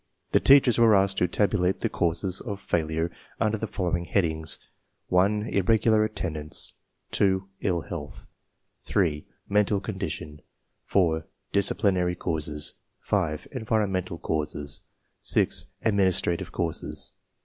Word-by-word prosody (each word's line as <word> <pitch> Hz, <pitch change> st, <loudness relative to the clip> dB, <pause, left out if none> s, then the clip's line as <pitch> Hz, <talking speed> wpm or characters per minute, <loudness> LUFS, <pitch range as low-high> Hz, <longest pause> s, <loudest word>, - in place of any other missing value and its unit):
The -, -, +5 dB
teachers 135 Hz, -4 st, +6 dB
were 115 Hz, -2 st, +6 dB
aSked 95 Hz, 0 st, +3 dB
to 90 Hz, -, +3 dB
tabulate 95 Hz, 0 st, +1 dB
the -, -, +2 dB
causes 90 Hz, +2 st, -1 dB
of 100 Hz, -4 st, -5 dB
failure 80 Hz, -2 st, -1 dB, 0.3 s
under 110 Hz, 0 st, +2 dB
the 110 Hz, 0 st, -3 dB
following 85 Hz, -3 st, -1 dB
headings: 80 Hz, -4 st, 0 dB, 0.5 s
(1) 100 Hz, +4 st, +3 dB
irregular 110 Hz, +2 st, +3 dB
attendance, 85 Hz, -8 st, 0 dB, 0.4 s
(2) 95 Hz, -1 st, +2 dB
ill 90 Hz, -4 st, 0 dB
health, 75 Hz, -4 st, -7 dB, 0.6 s
(3) 80 Hz, -6 st, 0 dB, 0.2 s
mental 105 Hz, 0 st, +2 dB
condition, 85 Hz, -7 st, -5 dB, 0.4 s
(4) 80 Hz, -5 st, +1 dB, 0.2 s
disciplinary 95 Hz, -3 st, +2 dB
causes, 75 Hz, -4 st, -2 dB, 0.3 s
(5) 80 Hz, -7 st, -1 dB
environmental 100 Hz, -7 st, -1 dB
causes, 75 Hz, -2 st, -3 dB, 0.4 s
(6) -, -, +1 dB, 0.2 s
administrative 95 Hz, -5 st, +2 dB
causes. 85 Hz, -2 st, -4 dB
95 Hz, 110 wpm, -26 LUFS, 80-100 Hz, 0.6 s, teachers